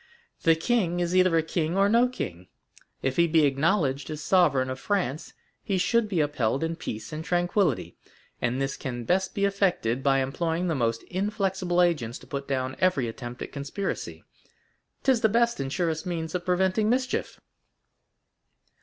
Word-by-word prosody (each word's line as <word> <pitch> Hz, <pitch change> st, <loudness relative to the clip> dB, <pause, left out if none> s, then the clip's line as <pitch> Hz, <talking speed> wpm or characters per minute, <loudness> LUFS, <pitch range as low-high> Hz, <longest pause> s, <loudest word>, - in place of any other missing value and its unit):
The 165 Hz, -1 st, +5 dB
king 175 Hz, -1 st, 0 dB
is 175 Hz, +1 st, 0 dB
either 185 Hz, -2 st, +4 dB
a 160 Hz, -, +2 dB
king 160 Hz, +2 st, -1 dB
or 195 Hz, 0 st, +4 dB
no 235 Hz, +4 st, +4 dB
king; 90 Hz, -, -6 dB, 0.6 s
if 135 Hz, 0 st, -1 dB
he 170 Hz, 0 st, +5 dB
be 160 Hz, -2 st, +4 dB
acknowledged 140 Hz, 0 st, +1 dB
as 155 Hz, -1 st, -5 dB
sovereign 150 Hz, -7 st, +3 dB
of 130 Hz, -, -5 dB
France, 175 Hz, -7 st, -2 dB, 0.3 s
he 195 Hz, -, 0 dB
should 230 Hz, +4 st, +2 dB
be 180 Hz, -6 st, +1 dB
upheld 140 Hz, -2 st, 0 dB
in 165 Hz, 0 st, -1 dB
peace 110 Hz, -6 st, -6 dB
and 155 Hz, +1 st, -4 dB
tranquillity; 175 Hz, -, 0 dB, 0.4 s
and 125 Hz, +2 st, 0 dB
this 135 Hz, 0 st, -2 dB
can 120 Hz, -4 st, -5 dB
best 190 Hz, +9 st, 0 dB
be 200 Hz, -, +2 dB
effected 185 Hz, -, +1 dB
by 135 Hz, 0 st, +3 dB
employing 165 Hz, +6 st, -1 dB
the -, -, +1 dB
most 115 Hz, -4 st, 0 dB
inflexible 190 Hz, -2 st, 0 dB
agents 140 Hz, -10 st, 0 dB
to -, -, -15 dB
put 140 Hz, 0 st, -5 dB
down 130 Hz, -1 st, -2 dB
every 165 Hz, -10 st, +2 dB
attempt 120 Hz, +1 st, -6 dB
at -, -, -8 dB
conspiracy—'tis 200 Hz, -, -4 dB
the 220 Hz, -, +4 dB
best 235 Hz, +2 st, +2 dB
and 135 Hz, -1 st, -3 dB
surest 165 Hz, +1 st, -1 dB
means 160 Hz, -2 st, -3 dB
of 180 Hz, -1 st, -3 dB
preventing 190 Hz, +3 st, +2 dB
mischief." 255 Hz, +2 st, -1 dB
165 Hz, 165 wpm, -26 LUFS, 135-190 Hz, 0.6 s, The